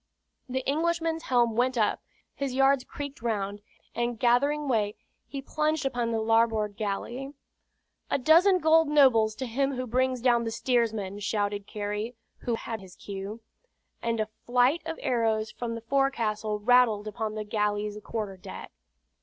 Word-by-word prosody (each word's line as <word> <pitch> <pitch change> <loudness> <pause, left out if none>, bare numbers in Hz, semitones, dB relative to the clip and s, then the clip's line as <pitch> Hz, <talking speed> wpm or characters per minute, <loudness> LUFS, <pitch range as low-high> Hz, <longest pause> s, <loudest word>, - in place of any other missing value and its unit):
The 260 +1 -3
Englishman's 325 +2 0
helm 240 -6 +2
went 250 +2 +1
up, 215 -2 +1 0.3
his 275 -2 -3
yards 270 0 +4
creaked 285 -1 -7
round, 205 -3 -2 0.3
and 240 0 -1
gathering 280 +6 +2
way 215 -5 +1 0.3
he 275 -1 -6
plunged 305 0 0
upon 245 -3 0
the 225 -1 0
larboard 220 -2 +2
galley. 240 +7 -4 0.7
"A - - +2
dozen 335 +8 +5
gold 320 -1 +4
nobles 255 -7 +4
to 260 - -4
him 270 +4 0
who 255 0 -3
brings 255 +1 +1
down 240 -1 +3
the 225 - -2
steersman!" 225 -4 0
shouted 205 -1 -1
Carey, 210 +3 -4 0.2
who 235 - -1
had 225 -1 -5
his 185 -2 -13
cue. 200 +3 -7 0.6
And 230 -1 -1
a 215 - +1
flight 245 +7 +1
of 325 - -4
arrows 220 -3 +1
from 235 -1 -4
the 230 - -6
forecastle 230 -5 0
rattled 220 -1 +4
upon 215 0 -3
the 215 - -3
galley's 210 0 -1
quarter 210 -4 -4
deck. 180 - -9
235 Hz, 155 wpm, -28 LUFS, 215-270 Hz, 0.7 s, dozen